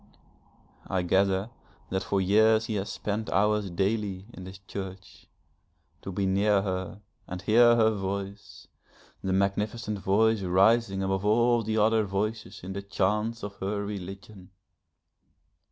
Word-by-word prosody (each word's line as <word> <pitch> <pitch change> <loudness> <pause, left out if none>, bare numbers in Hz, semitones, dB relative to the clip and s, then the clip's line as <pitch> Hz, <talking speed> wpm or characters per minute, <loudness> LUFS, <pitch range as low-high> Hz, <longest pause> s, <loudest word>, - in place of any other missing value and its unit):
I 95 -1 -1
gather 95 +4 +1 0.4
that 95 0 0
for 100 0 -1
years 110 +4 +4
he 110 - -3
has 100 0 -3
spent 105 +1 -3
hours 105 0 +1
daily 95 +1 -1
in 95 - -9
this 95 +1 -9
church, 95 -1 -9 0.7
to 95 - -6
be 95 +1 -1
near 100 +1 +2
her, 95 +1 -4 0.3
and 90 - -5
hear 120 +4 +5
her 110 -1 +4
voice, 100 0 -5 0.6
the 95 - -1
magnificent 105 +3 -1
voice 110 +3 +2
rising 95 +2 +3
above 95 0 -1
all 120 +3 +3
the 110 0 -2
other 110 +1 +3
voices 105 +3 -3
in 95 +1 -6
the 100 - -4
chants 105 +3 -1
of 100 0 -6
her 100 +1 -3
religion. 95 0 -8
100 Hz, 135 wpm, -27 LUFS, 95-110 Hz, 0.7 s, hear